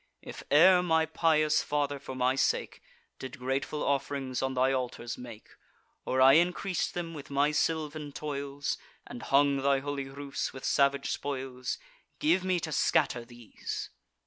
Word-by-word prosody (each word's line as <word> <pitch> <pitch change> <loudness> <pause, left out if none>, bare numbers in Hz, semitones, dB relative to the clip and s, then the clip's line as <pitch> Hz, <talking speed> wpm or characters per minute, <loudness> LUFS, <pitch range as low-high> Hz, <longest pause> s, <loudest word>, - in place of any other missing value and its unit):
If - - -8
e'er 180 +5 +7
my 160 -2 +2
pious 155 -1 +2
father, 145 -1 -1
for 130 -1 -8
my 130 0 +2
sake, 135 - 0 0.4
Did 130 +1 -7
grateful 135 +3 -2
off'rings 140 -2 -1
on 130 0 -1
thy 130 +1 +3
altars 125 -2 -3
make, 120 -3 -11 0.6
Or 130 - 0
I 135 +3 +8
increas'd 180 +2 0
them 170 -1 -4
with 145 -3 -9
my 140 +1 +2
sylvan 150 -1 -1
toils, 140 -1 -4 0.3
And 120 - -9
hung 140 +2 +3
thy 135 0 +2
holy 140 0 -4
roofs 140 0 -4
with 130 - -8
savage 140 -1 +2
spoils, 130 -2 -4 0.4
Give 295 - +2
me 185 -1 +1
to 160 - -4
scatter 125 -3 +2
these." 120 -2 -7
140 Hz, 150 wpm, -29 LUFS, 130-150 Hz, 0.6 s, I